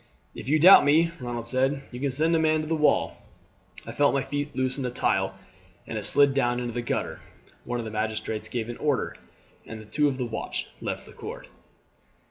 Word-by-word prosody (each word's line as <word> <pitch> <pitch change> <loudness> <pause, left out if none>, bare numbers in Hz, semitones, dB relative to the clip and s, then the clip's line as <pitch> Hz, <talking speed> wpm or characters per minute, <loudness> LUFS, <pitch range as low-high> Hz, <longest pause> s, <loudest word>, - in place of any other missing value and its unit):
"If - - -7
you 155 - +4
doubt 180 +5 +9
me," 160 +4 +3
Ronald 120 -2 -5
said, 135 +3 0
"you 125 - -7
can 140 +1 0
send 155 +5 +2
a - - +3
man 155 -1 +2
to 155 - -6
the 165 - -1
wall. 150 -1 +1 0.6
I - - -6
felt 145 -1 +2
my 135 - +1
feet 145 +1 -4
loosen 130 +1 -1
a 125 - -1
tile 95 -5 0 0.5
and - - -7
it 105 -2 -1
slid 140 -1 +5
down 120 -3 +1
into 120 -1 -4
the 120 - -2
gutter." 120 - -3 0.4
One 120 0 -3
of 120 - -4
the 110 - -6
magistrates 110 0 -3
gave 115 -2 -3
an 120 - -6
order, 145 -3 -1 0.5
and 110 -1 -10
two 150 +4 +2
of 135 -2 -2
the 125 - -2
watch 115 - -5
left - - -4
the - - -14
court. - - -9
130 Hz, 210 wpm, -26 LUFS, 120-145 Hz, 0.6 s, doubt